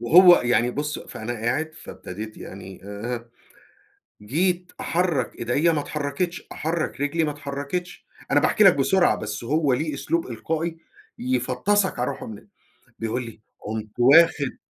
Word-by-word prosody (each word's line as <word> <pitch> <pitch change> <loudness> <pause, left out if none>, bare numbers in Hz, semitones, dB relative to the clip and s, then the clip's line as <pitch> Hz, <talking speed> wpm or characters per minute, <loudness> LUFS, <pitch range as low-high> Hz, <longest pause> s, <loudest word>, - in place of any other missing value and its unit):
وهو 175 +9 +8
يعني 120 0 +2
بُصّ، 150 +3 -3
فأنا 110 +2 -6
قاعد 125 +8 -2
فابتديت 105 - -8
يعني 95 0 -9
آآ، 115 +4 -5 0.9
جيت 175 - 0
أحرّك 170 -8 0
إيديا 140 +8 +2
ما 150 -3 0
اتحركتش، 150 +5 -3
أحرّك 160 -2 -2
رجلي 160 +3 +1
ما 150 - 0
اتحركتش 145 +5 -5 0.3
أنا - - +5
باحكي 215 - +3
لك 195 -3 +8
بسرعة 175 +7 +3
بس 105 +1 -5
هو 145 +2 +2
له 150 +4 -1
أسلوب 165 +4 -1
إلقائي 160 +7 -3 0.4
يفطسك 130 +11 +1
على 125 - 0
روحه - - -8
من 110 - -7
ال - - -18 0.5
بيقول 115 +2 -2
لي: 115 -1 -11 0.2
"قمت 110 0 -5
واخد 140 +1 +5
140 Hz, 145 wpm, -24 LUFS, 120-165 Hz, 0.9 s, وهو